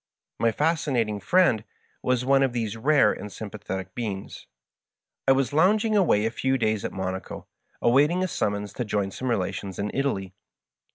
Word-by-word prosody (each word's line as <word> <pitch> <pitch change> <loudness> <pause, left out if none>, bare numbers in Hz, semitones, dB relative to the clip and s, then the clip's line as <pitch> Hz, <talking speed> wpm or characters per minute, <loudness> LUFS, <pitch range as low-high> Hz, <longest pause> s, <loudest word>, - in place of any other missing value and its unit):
My 115 - +3
Fascinating 130 -8 0
Friend 120 - +3 0.4
was 125 -1 0
one 135 +1 +4
of 135 -3 +2
these 115 -3 -2
rare 145 +6 +4
and 105 - -8
sympathetic 100 -2 -6
beings. 105 -5 -5 0.8
I - - +7
was 135 +1 0
lounging 210 +7 +3
away 155 - +3
a 115 - 0
few 130 +2 0
days 110 -4 0
at - - -3
Monaco, 95 0 -5 0.4
await 135 +5 +5
ing, 180 +2 0
a - - +1
summons 105 - -2
to 125 - -3
join 100 -3 -1
some 130 +6 -4
relations 95 -3 -2
in 105 +1 -2
Italy. 100 -9 -1
115 Hz, 165 wpm, -25 LUFS, 100-140 Hz, 0.8 s, I